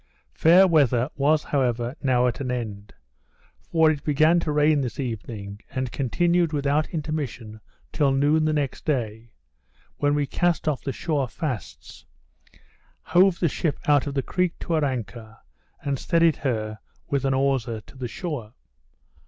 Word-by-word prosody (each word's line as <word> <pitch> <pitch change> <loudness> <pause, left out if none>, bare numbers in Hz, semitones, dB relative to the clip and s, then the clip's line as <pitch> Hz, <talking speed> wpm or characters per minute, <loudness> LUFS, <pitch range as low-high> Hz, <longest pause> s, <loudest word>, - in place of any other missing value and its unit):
Fair 175 +4 +6
weather 140 -5 +3
was, 150 +2 +2
however, 125 -2 -1
now 125 -3 +2
at 125 - -1
an 135 -2 -3
end; 105 -5 -5 0.7
for 160 -1 +3
it 145 -2 -4
began 155 +3 +3
to 165 -2 -2
rain 150 0 +3
this 125 0 -4
evening, 105 -4 -5
and 130 -2 -3
continued 170 +5 +1
without 145 +1 +1
intermission 145 -9 -4 0.3
till 145 -4 +2
noon 145 +3 +2
the 155 - +2
next 145 -4 -2
day, 115 -6 -2 0.7
when 145 0 +1
we 145 -1 +1
cast 170 +3 0
off 150 -4 0
the 135 - -2
shore 145 -1 -1
fasts, 120 - -6 1.0
hove 180 +1 +3
the 170 - +2
ship 155 0 -1
out 145 -1 +4
of 140 - -4
the 135 - 0
creek 180 -2 -1
to 170 - -4
her 155 -2 +2
anchor, 115 -4 -4 0.5
and 140 -2 -2
steadied 165 -3 +2
her 110 -5 -2 0.3
with 140 -2 +1
an 135 -1 +1
hawser 130 -4 0
to 105 - -18
the 130 -2 -5
shore. 120 - -6
140 Hz, 155 wpm, -24 LUFS, 120-155 Hz, 1.0 s, Fair